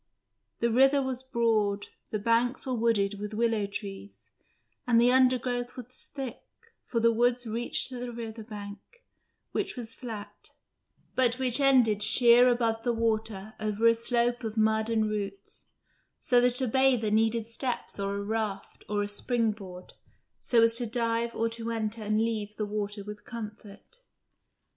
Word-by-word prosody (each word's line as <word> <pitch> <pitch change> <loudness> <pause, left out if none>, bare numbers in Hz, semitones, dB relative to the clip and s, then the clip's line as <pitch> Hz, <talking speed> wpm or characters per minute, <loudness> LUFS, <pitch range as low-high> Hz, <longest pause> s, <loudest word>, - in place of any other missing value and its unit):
The 235 0 +2
river 270 +4 +5
was 260 -2 -3
broad, 225 -5 0 0.2
the 215 - -2
banks 230 +4 +1
were 260 - -2
wooded 215 -4 +1
with 210 +1 -5
willow 225 -2 +1
trees, 200 -1 -9 0.6
and 235 -1 +4
the 240 +1 +5
undergrowth 250 -1 +2
was 250 +1 -7
thick, 270 -4 -6 0.5
for 230 - -1
the 230 0 +4
woods 245 +2 +1
reached 230 +4 -1
to 255 -2 -7
the 245 0 -5
river 230 -1 -7
bank, 205 -2 -8 0.7
which - - -2
was 230 -2 -5
flat, 220 -5 -9 0.6
but 250 -1 +5
which 260 0 +1
ended 250 -7 +4
sheer 240 +3 +6
above 230 -2 0
the 240 0 0
water 220 -2 -2
over 215 +1 -1
a 230 - +7
slope 240 +1 0
of 220 0 -5
mud 220 0 +2
and 220 -1 +1
roots, 200 -2 -6 0.5
so 245 -1 +3
that 245 +1 +3
a 260 - +1
bather 250 -3 +2
needed 225 +1 +2
steps 235 -1 -3
or 200 0 -2
a 200 - -3
raft 215 -1 -4
or 205 0 0
a - - -3
springboard, 205 -4 -2 0.5
so 230 -2 +3
as 230 0 +4
to 235 0 0
dive 230 0 -1
or 230 - 0
to 230 0 -5
enter 225 -1 -3
and 215 0 0
leave 215 -2 -2
the 210 - -2
water 205 0 -4
with 210 0 -9
comfort. 215 - -10
230 Hz, 160 wpm, -28 LUFS, 210-245 Hz, 0.7 s, a